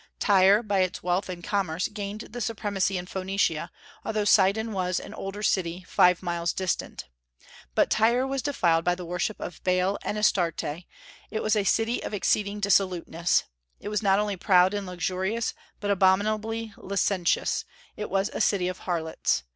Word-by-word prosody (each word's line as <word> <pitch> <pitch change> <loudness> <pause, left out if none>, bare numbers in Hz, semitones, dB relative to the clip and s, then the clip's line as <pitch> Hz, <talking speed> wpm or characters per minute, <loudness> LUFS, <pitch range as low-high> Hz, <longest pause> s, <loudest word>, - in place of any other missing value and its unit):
Tyre, 200 +1 +5
by 205 -3 0
its 185 -1 -1
wealth 180 +2 0
and 175 -1 -6
commerce, 180 -4 -1
gained 210 0 -6
the 245 +2 -8
supremacy 205 -4 -1
in 180 - -5
Phoenicia, 185 -3 -1 0.3
although 215 -1 -1
Sidon 210 +3 +3
was 185 -3 -1
an - - -9
older 195 +2 -6
city, 180 -3 0
five 180 0 +4
miles 170 -1 -1
distant. 185 -1 -3 0.7
But - - +3
Tyre 235 +4 +3
was 270 0 -2
defiled 170 - +1
by 175 +1 +2
the 180 0 -8
worship 180 +5 -2
of 175 - -7
Baal 185 +2 +1
and 210 - -3
Astarte; 180 -6 +1 0.7
it 220 - -3
was 215 0 +2
a 210 - +2
city 225 +4 +1
of - - -4
exceeding 205 +1 0
dissoluteness. 180 -4 +2 0.4
It - - -6
was 210 0 -1
not 195 -2 +3
only 205 -1 -1
proud 185 0 +4
and 205 -2 -3
luxurious, 190 +5 -2 0.3
but 205 -1 -1
abominably 215 +3 +1
licentious; 195 -2 0 0.3
it 210 - -5
was 195 +3 0
a - - -2
city 185 -3 +2
of 185 0 -4
harlots. 160 - -1
195 Hz, 165 wpm, -26 LUFS, 180-210 Hz, 0.7 s, Tyre